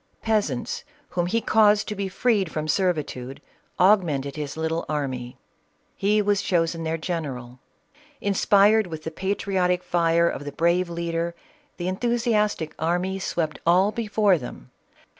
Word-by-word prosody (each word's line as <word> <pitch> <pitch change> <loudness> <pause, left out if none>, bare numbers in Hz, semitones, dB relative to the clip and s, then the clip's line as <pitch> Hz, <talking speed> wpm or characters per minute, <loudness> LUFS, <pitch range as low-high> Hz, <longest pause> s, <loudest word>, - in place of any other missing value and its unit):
Peasants, 205 - -1 0.3
whom 175 -1 -1
he 230 +5 0
caused 210 -1 +4
to - - -2
be 195 -1 -3
freed 200 -2 +1
from 155 -1 -3
''servitude, 150 -7 -1 0.4
augmented 165 -9 +3
his 150 0 -5
little 160 +1 -1
army; 130 -5 -3 0.6
he 210 +2 +2
was 205 -1 +2
chosen 165 -3 0
their 160 0 -1
general. 135 -8 -5 0.6
Inspired 205 +1 +4
with 160 -2 -7
the 160 - -4
patriotic 185 0 0
fire 170 -1 +2
of 145 - -3
the 145 - -6
brave 170 +4 +1
leader, 170 0 -2 0.4
the 175 - -3
enthusiastic 210 -4 0
army 180 +4 0
swept 165 -4 -2
all 185 +4 +4
before 210 -4 +2
them. 125 - -10
175 Hz, 135 wpm, -24 LUFS, 160-200 Hz, 0.6 s, caused